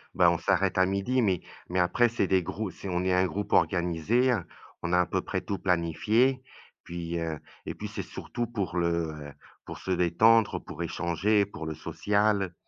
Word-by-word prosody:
bah, - - +5
on - - 0
s'arrête 95 0 +1
à 95 - +5
12:00 100 +7 0
mais 95 -5 +1 0.3
mais 90 +1 0
après, 100 +7 +3
c'est 105 -5 0
des 95 -1 +3
grou 100 +2 -4
c'est 100 - -8
on 90 0 -1
est 95 0 +1
un 90 +1 +3
groupe 100 +2 -3
organisé, 90 +8 +2
heu, 100 -8 0 0.4
on 85 - -3
a 90 - +5
à - - +1
peu - - -1
près - - -3
tout 100 - -4
planifié 95 - +2
et 130 -1 -9 0.4
puis, 85 0 -4
heu, 80 -2 -3 0.3
et - - -5
puis, - - -6
c'est - - -5
surtout 120 - -5
pour 100 -6 -3
le, 85 -2 0
heu, 75 -2 -9 0.3
pour - - -8
se 95 - -5
détendre, 95 +6 +4
pour 85 - -6
échanger, 90 +5 +1
pour 80 -5 -8
le 80 -1 -4
social. 100 -3 0
95 Hz, 205 wpm, -28 LUFS, 85-105 Hz, 0.4 s, bah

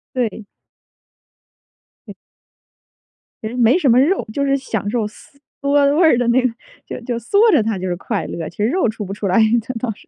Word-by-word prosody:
对。 225 -3 -2 1.6
对。 - - -10 1.3
其 220 - -3
实 245 - -6
没 240 +2 +4
什 305 -7 +1
么 245 +2 +5
肉， 340 +8 +2
就 280 +4 -1
是 275 0 +2
享 220 -7 -4
受 230 -4 -1
嗦 210 - -17 0.3
嗦 280 0 +3
味 345 - +3
儿 315 -6 +5
的 245 - 0
那 240 +2 +3
个 255 - +2 0.4
就 - - -7
就 240 0 -3
嗦 405 - +3
着 285 - +3
它 220 -2 -2
就 185 - -4
是 175 - -2
快 175 -1 -4
乐， 165 -2 -5
其 - - -21
实 210 - 0
肉 335 -1 +1
出 220 0 -4
不 195 0 -6
出 205 - -6
来， 185 +4 +2 0.2
这 255 - -5
倒 240 -2 -2
是 - - -21
240 Hz, 225 characters per minute, -19 LUFS, 215-280 Hz, 1.6 s, 么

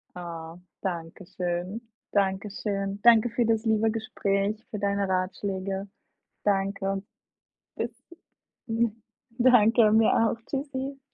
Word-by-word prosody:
Oh, 165 -1 -7 0.2
danke 175 -1 -4
schön. 180 +3 -3 0.3
Danke 195 0 +1
schön. 200 -1 -3
Danke 235 0 +6
für 235 +1 +1
das 225 0 +1
liebe 220 0 +3
Gespräch, 210 -1 -1
für 210 - -4
deine 200 -1 0
Ratschläge. 190 +1 -2 0.6
Danke. 195 -1 0 0.7
Bis 240 - -2 0.8
hm 225 -1 0 0.4
Danke, 230 -3 +6
mir 220 0 +5
auch. 230 0 +2
Tschüssi. 275 -1 -4
205 Hz, 110 wpm, -27 LUFS, 195-225 Hz, 0.8 s, Danke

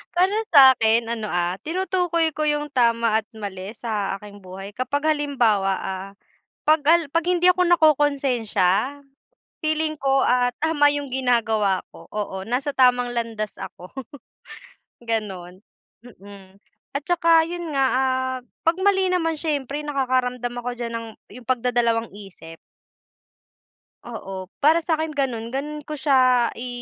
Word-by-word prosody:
para 370 +3 +3 0.2
sa 270 -4 +9
'kin 225 +1 +3
ano, 225 -2 -4
ah, 175 0 0
tinutukoy 345 -1 0
ko 305 - -5
yung 295 -1 0
tama 230 -3 +2
at - - -32
mali 200 -3 -7
sa 210 -5 -3
aking 205 0 -13
buhay 195 +2 -9
kapag 285 +6 0
halimbawa, 230 -10 +1
ah, 190 0 -5 0.6
'pag 310 0 +4
al 340 +1 +6
'pag 335 0 +1
hindi 355 -1 +1
ako 365 0 +5
nakokonsensya 275 - +2 0.6
feeling 310 0 0
ko 270 0 +2
at 245 0 +3
tama 300 -2 +3
yung 290 0 -3
ginagawa 225 -6 +1
ko, - - -15
oo 200 -2 -4
nasa 255 +7 -2
tamang 245 -1 +3
landas 225 -3 -3
ako. 180 +6 -10 1.1
Gano'n, 200 -5 -5 0.4
mm, 200 -4 -14 0.4
at 280 - -2
saka 330 -2 +4
yun 345 -2 -5
nga, 275 -1 +2
ah, 260 0 0 0.3
'pag 330 +1 +3
mali 385 -2 +3
naman 330 -4 -1
siyempre 290 -3 -2
nakakaramdam 255 -3 -1
ako 245 +1 -4
diyan 235 -1 -5
ng 230 0 -6 0.3
yung 240 - -20
pagdadalawang 235 -2 0
isip. 195 -5 -12 1.5
Oo, 195 -5 -7
para 315 +3 +4
sa 320 -2 0
'kin 315 -1 -3
gano'n, 240 -5 -2
gano'n 290 +4 -4
ko 305 - -5
siya 255 -4 +3
i 250 +2 -7
250 Hz, 140 wpm, -23 LUFS, 220-300 Hz, 1.5 s, sa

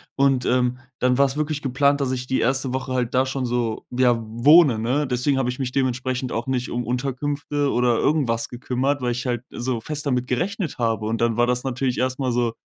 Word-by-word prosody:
Und, 135 -2 +2
ähm, 125 0 +1 0.2
dann 125 0 +2
war's 140 -1 +3
wirklich 155 -1 -2
geplant, 140 +2 +2
dass 130 - 0
ich 125 -1 -3
die 130 - 0
1. 130 +1 0
Woche 130 0 -3
halt 125 -2 -1
da 130 - +4
schon 135 -1 -2
so, 120 -2 -2
ja, 125 -1 +3
wohne, 130 +4 +5
ne? 130 +5 0
Deswegen 130 +2 +1
habe 125 - 0
ich 125 - -4
mich 125 -2 -2
dementsprechend 130 -1 -1
auch 115 +1 -2
nicht 130 -1 -1
um 120 0 -3
Unterkünfte 140 +3 -2
oder 120 -1 +2
irgendwas 120 -7 +1
gekümmert, 130 +3 -2
weil 125 - 0
ich 125 +2 -3
halt 120 -2 -1
so 120 -2 -3
fest 150 +4 -5
damit 125 -3 0
gerechnet 180 - -2
habe. 115 -2 -1
Und 115 +1 -1
dann 115 -1 +1
war 120 +1 +2
das 125 0 0
natürlich 130 -1 -1
erst 130 +1 -1
mal 130 -2 0
so 120 -1 0
125 Hz, 220 wpm, -23 LUFS, 120-135 Hz, 0.2 s, wohne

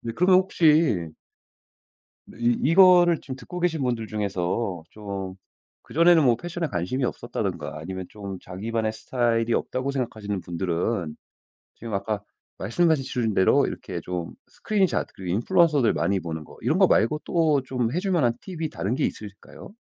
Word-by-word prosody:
그러면 180 +2 +5
혹시 150 - +3 1.2
네 - - -15
이 120 0 +3
이거를 175 -2 +6
지금 130 -2 -7
듣고 180 +6 -8
계신 165 -4 0
분들 120 -3 -1
중에서 100 -2 -2
좀 100 -3 -6 0.5
그전에는 170 +1 +4
뭐 120 -2 +4
패션에 175 -1 -4
관심이 100 +8 -2
없었다든가 100 - -4
아니면 95 +3 -6
좀 100 -3 -7
자기만의 110 +4 -3
스타일이 115 0 0
없다고 130 +2 -1
생각하시는 110 -7 -3
분들은 85 0 -2 0.6
지금 115 -2 -8
아까 100 +1 -2 0.4
말씀해 165 +5 +2
주신대로 125 -2 +2
이렇게 90 -4 -6
좀 90 -1 -5
스크린샷 200 -4 0
그리고 90 -2 -4
인플루언서들 150 - +3
많이 100 -1 0
보는거 80 -2 -7
이런거 - - +3
말고 150 +8 +2
또 155 -5 +2
좀 125 -3 -1
해 175 - 0
줄만한 175 - +1
팁이 165 -5 -5
다른 105 -1 -2
게 - - +1
있을까요? 105 - -8
115 Hz, 345 characters per minute, -25 LUFS, 100-155 Hz, 1.2 s, 이거를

